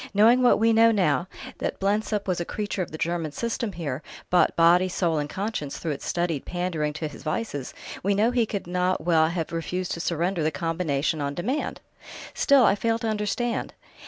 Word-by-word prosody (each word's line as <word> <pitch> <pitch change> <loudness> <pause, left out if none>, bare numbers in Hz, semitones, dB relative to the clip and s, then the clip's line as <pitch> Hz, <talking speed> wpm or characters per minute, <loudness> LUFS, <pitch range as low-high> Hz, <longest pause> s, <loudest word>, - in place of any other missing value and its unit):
Knowing 230 +5 +6
what 250 - +5
we 225 +1 +3
know 225 +1 +6
now, 180 -4 +1 0.3
that - - -3
Blensop 205 +1 0
was 185 -2 0
a - - 0
creature 205 +2 -3
of 175 - -3
the 155 - -7
German 165 -1 -2
system 230 +3 -3
here, 150 -5 -4 0.3
bought 180 - +4
body, 175 +2 +5
soul, 170 -3 0
and 145 0 -3
conscience 195 -8 -3
through 165 - -3
its 140 - -5
studied 170 -5 -1
pandering 175 -4 -2
to 155 +1 -3
his 150 - -11
vices, 155 - -3 0.3
we 200 +1 +1
know 220 +4 +3
he 240 -3 +1
could 200 -2 -4
not 180 +1 0
well 160 -1 +3
have 170 -2 -3
refused 175 +2 -3
to - - -3
surrender 170 +2 -1
the 155 - +2
combination 160 -1 -1
on 140 0 -2
demand." 255 +12 -2 0.5
"Still 275 -4 +5
I - - +5
fail 225 +2 0
to 230 -1 -3
understand...." 215 +3 -2
180 Hz, 195 wpm, -25 LUFS, 160-210 Hz, 0.5 s, Knowing